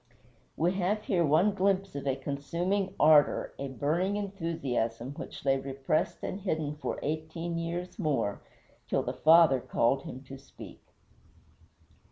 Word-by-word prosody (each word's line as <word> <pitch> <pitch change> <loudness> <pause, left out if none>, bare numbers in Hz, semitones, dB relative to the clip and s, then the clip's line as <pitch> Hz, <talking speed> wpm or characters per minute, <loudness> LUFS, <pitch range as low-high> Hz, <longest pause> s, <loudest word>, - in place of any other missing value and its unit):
We 170 +3 +2
have 205 +4 0
here 180 -5 +1
one 165 +7 +3
glimpse 195 0 +1
of 140 0 -5
a 135 - +2
consuming 170 +8 -2
ardor, 150 -1 +5
a 140 - -3
burning 155 - 0
enthusiasm, 160 - -2
which 145 - -9
lay 135 0 +3
repressed 135 +3 -2
and 195 - -4
hidden 155 -6 -2
for - - -3
eighteen 160 +2 -3
years 175 +3 -4
more, 145 - 0 0.5
till - - 0
the - - -3
Father 160 -4 +6
called 120 +2 +1
him 130 0 -8
to 135 0 -10
speak. 140 - -13
155 Hz, 140 wpm, -29 LUFS, 135-180 Hz, 0.5 s, Father